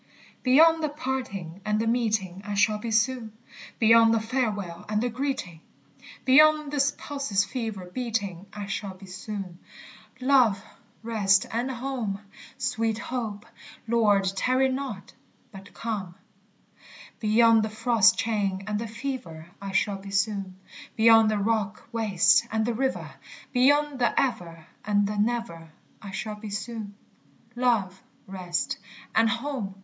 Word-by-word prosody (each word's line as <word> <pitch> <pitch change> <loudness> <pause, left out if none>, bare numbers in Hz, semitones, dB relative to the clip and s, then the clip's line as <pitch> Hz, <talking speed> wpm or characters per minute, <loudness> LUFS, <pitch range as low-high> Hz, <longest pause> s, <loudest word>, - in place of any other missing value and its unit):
Beyond 320 +5 +5
the 305 - +1
parting 255 - -5
and 210 +1 0
the 225 - 0
meeting 215 -6 0
I 205 0 -4
shall 210 +1 +2
be 230 - -5
soon; 225 0 0 0.4
Beyond 225 0 +6
the - - +2
farewell 215 -7 -2
and 210 0 +1
the 245 +2 0
greeting, 245 - -4 0.6
Beyond 305 +2 +5
this 280 0 +2
pulse's 275 -9 -1
fever 220 -7 -5
beating, 200 -3 -4
I 210 -1 -6
shall 195 -1 -4
be 190 +1 -13
soon. 190 -1 -7 0.6
Love, 255 -6 +4 0.4
rest, 200 -4 +3
and 240 +3 -1
home! 245 -5 -3 0.4
etc. 225 -1 -2 0.4
Beyond 215 -4 +3
the 255 0 -1 2.6
frost 215 -3 +3
chain 200 -4 -1
and 210 0 -2
the 230 - -4
fever 220 -9 -6
I 195 -1 -5
shall 195 +1 +1
be 195 +1 -10
soon; 195 -1 -1 0.4
Beyond 225 -1 +6
the 215 - 0
rock 210 0 -1
waste 215 -6 +3
and 220 0 0
the 240 - 0
river, 265 +3 -2 0.4
Beyond 285 +2 +3
the 240 - +2
ever 170 -10 -2 0.2
and 205 -1 +2
the 210 +1 -3
never, 210 -8 -2 0.3
I 200 - -8
shall 210 +3 -5
be 210 0 -8
soon. 205 0 -5 0.6
_Love, 235 -7 +1 0.3
rest, 180 -2 -3 0.3
and 225 0 +4
home! 240 -5 -3
220 Hz, 125 wpm, -26 LUFS, 195-250 Hz, 2.6 s, Beyond